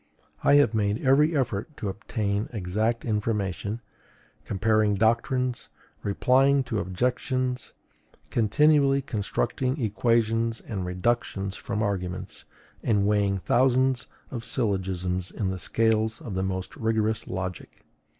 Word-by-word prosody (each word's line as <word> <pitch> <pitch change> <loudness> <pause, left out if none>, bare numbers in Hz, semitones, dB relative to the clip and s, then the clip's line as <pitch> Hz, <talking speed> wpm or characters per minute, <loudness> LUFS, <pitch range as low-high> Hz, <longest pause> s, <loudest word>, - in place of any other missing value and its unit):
I 140 - +6
have 145 -4 +5
made 105 +2 0
every 150 +4 +4
effort 130 +3 -2
to 105 - -4
obtain 100 +1 -2
exact 110 +3 -1
information, 105 -1 -2 0.6
comparing 110 +1 +2
doctrines, 120 +4 +1 0.3
replying 135 +7 +3
to 115 -4 -2
objections, 125 +6 -1 0.6
continually 140 +4 +3
constructing 130 +4 -1
equations 115 +1 +1
and 95 -4 -5
reductions 100 0 -1
from 105 +2 -3
arguments, 90 -3 -3 0.4
and 105 -3 +2
weighing 100 -1 +2
thousands 130 +4 +2 0.2
of 120 -3 -5
syllogisms 95 -6 -1
in 95 -3 -2
the 95 - -4
scales 110 +2 +1
of 110 - -7
the 95 - -1
most 95 -1 -3
rigorous 110 0 0
logic. 90 -2 -6
110 Hz, 110 wpm, -26 LUFS, 100-125 Hz, 0.6 s, I